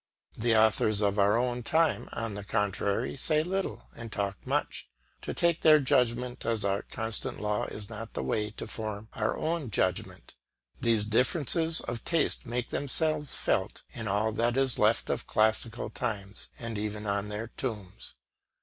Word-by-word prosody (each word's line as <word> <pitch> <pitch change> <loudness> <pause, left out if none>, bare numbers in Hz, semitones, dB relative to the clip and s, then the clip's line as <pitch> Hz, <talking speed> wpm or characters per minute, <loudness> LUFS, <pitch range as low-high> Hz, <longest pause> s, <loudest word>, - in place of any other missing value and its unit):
The 115 0 +2
authors 110 -1 +4
of 100 0 +1
our 100 +2 +4
own 125 0 0
time, 160 +7 +1
on 115 -2 -3
the 100 0 -6
contrary, 100 +3 -1
say 155 +2 +4
little 190 +3 -3
and 115 -1 -8
talk 100 -1 -3
much. - - -1 0.3
To - - -4
take 170 -2 +1
their 155 -1 +7
judgment 125 -2 +1
as 115 -3 0
our 100 0 +1
constant 110 -2 -4
law 105 0 -1
is 105 -1 -7
not 110 +1 -7
the - - -2
way 105 +11 -1
to 110 - -8
form 110 -1 -4
our 110 - -1
own 160 -5 -2
judgment. 95 -2 -2 0.5
These 115 -3 +2
differences 155 +8 +4
of 120 -1 -5
taste 165 -5 0
make 120 +1 -2
themselves 150 +1 +2
felt - - -1
in 115 -2 -5
all 105 +3 +1
that 120 +3 0
is 135 -3 +1
left - - +2
of - - -3
classical 110 +2 +1
times 105 -5 -4
and 115 -3 -4
even 105 0 -4
on 100 0 -1
their 105 +2 -4
tombs. 105 -9 -5
115 Hz, 165 wpm, -29 LUFS, 105-125 Hz, 0.5 s, their